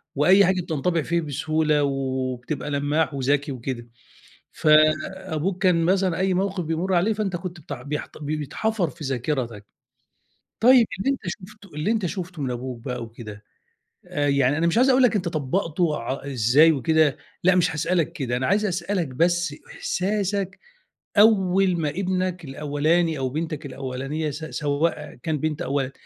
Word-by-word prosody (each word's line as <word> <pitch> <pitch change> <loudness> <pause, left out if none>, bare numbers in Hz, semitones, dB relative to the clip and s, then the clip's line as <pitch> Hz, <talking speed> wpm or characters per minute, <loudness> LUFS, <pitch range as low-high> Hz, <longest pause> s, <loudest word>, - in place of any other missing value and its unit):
وأي 185 +7 +6
حاجة 185 0 +1
بتنطبع 165 +1 -1
فيه 170 +2 0
بسهولة 155 0 0
وبتبقى 130 +1 -2
لمّاح 145 +2 0
وذكي 140 +1 0
وكده، 120 -1 -5 0.7
فأبوك 155 +4 +2
كان 170 -3 +3
مثلًا 185 -1 +2
أي 190 0 +1
موقف 190 -1 -1
بيمرّ 165 +4 -1
عليه 180 +6 +3
فأنت 200 -4 -2
كنت 175 -2 -7
بت - - -9
بيحت 145 +5 -5
بي 155 +1 -3
بيتحفر 180 +4 -1
في 160 -3 -10
ذاكرتك، 125 -5 -3 0.9
طيب 245 -1 +7
اللي 270 +8 +1
أنت 275 - -2
شُفته 200 +1 -9
اللي 150 +8 -1
أنت 215 -5 +1
شُفته 175 -4 -5
من 130 - -1
أبوك 125 -1 -5
بقى 125 -2 -4
وكده، 110 -2 -10 0.6
آآ، 145 0 -1
يعني 140 0 +2
أنا 170 +1 +2
مش 170 - +1
عايز 260 +2 +5
أقول 260 0 +5
لك 240 -3 +4
أنت 180 -3 0
طبّقته 155 +1 0
ع 130 +4 -4
إزاي 140 +4 +4
وكده، 155 +1 +2 0.3
لأ 185 0 +5
مش 175 -2 +3
هاسألك 165 +1 0
كده، 125 -3 -2
أنا 130 - -1
عايز 210 +2 +2
أسألك 180 -2 -1
بس 170 +3 +1 0.2
إحساسك 195 0 -1 0.6
أول 195 -4 +4
ما 155 - 0
ابنك 185 0 -2
الأولاني 150 +3 0
أو 130 - -1
بنتك 155 +1 -4
الأولانية 135 +3 -4
س 150 +3 -6
سواء 150 0 -2
كان 155 -2 -1
بنت 155 +3 -2
أو - - -4
ولد، 135 -1 0
160 Hz, 160 wpm, -24 LUFS, 140-185 Hz, 0.9 s, طيب